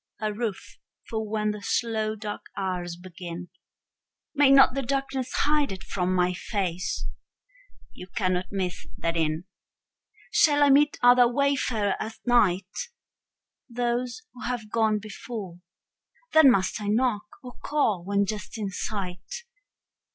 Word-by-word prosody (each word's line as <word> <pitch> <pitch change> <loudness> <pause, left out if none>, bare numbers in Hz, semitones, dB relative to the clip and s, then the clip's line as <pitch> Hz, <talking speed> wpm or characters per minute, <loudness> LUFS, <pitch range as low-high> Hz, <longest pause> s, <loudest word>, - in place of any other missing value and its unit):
A 215 -1 -1
roof 215 -2 -5 0.3
for 220 -1 -3
when 215 0 0
the 210 0 -7
slow 220 0 0
dark 210 -1 -6
hours 180 -3 -2
begin. 175 -1 -8 0.8
May 290 -2 +5
not 270 -1 +7
the 275 - -1
darkness 270 0 -2
hide 295 -5 +2
it 190 0 -7
from 185 -1 -1
my 180 0 +2
face? 185 -2 -2 0.9
You 180 - -10
cannot 185 -2 -1
miss 185 -3 -3
that 165 0 -1
inn. 160 0 0 0.9
Shall 290 -2 +5
I 285 - +6
meet 295 +2 +4
other 245 0 +7
wayfarers 255 -6 +1
at 220 +1 -4
night? 205 - +2 0.8
Those 245 - -2
who 250 - -12
have 235 -4 -4
gone 220 -2 +2
before. 210 -3 -7 0.7
Then 315 -3 +8
must 195 -2 +2
I 205 - -4
knock, 215 -1 +1 0.2
or 250 -1 -9
call 230 -12 +1
when 200 +2 +1
just 210 +1 -5
in 205 -3 -3
sight? 195 - -5
215 Hz, 135 wpm, -26 LUFS, 185-245 Hz, 0.9 s, Then